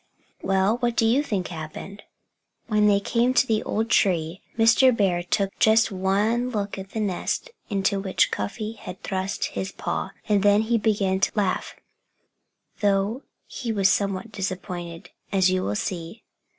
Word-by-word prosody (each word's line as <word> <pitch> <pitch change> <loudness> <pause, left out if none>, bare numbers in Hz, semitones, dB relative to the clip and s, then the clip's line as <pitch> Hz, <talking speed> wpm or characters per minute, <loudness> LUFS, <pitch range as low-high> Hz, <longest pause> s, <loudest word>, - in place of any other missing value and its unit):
Well 195 +4 +2
what 240 -1 0
do 225 - +4
you 240 +5 +4
think 205 -11 -2
happened? 170 +5 -8 0.6
When 210 -2 +3
they 200 -1 +4
came 240 +5 +1
to 245 - +5
the 220 -3 +1
old 225 +2 -2
tree 170 -1 +2 0.2
Mr. 230 +2 +5
Bear 185 -4 +2
took 195 +2 0
just 220 +1 +4
one 205 +6 +1
look 205 -4 -3
at 190 0 -8
the 220 - -4
nest 210 - -2 0.2
into 200 -1 0
which 190 -3 +1
Cuffy 210 - -3
had 185 -4 -10
thrust 190 0 -2
his 190 0 -3
paw. - - -3 0.2
And 205 -2 +3
then 205 +1 +4
he 230 +1 +1
began 200 -3 +1
to - - +2
laugh, 200 -3 -1 1.0
though 205 +4 +1 0.2
he 235 -3 -5
was 195 -3 +3
somewhat 195 +2 -1
disappointed, 180 -3 -5 0.2
as 190 -2 +3
you 185 0 +1
will 105 - -2
see. 170 - -4
200 Hz, 160 wpm, -24 LUFS, 190-220 Hz, 1.0 s, to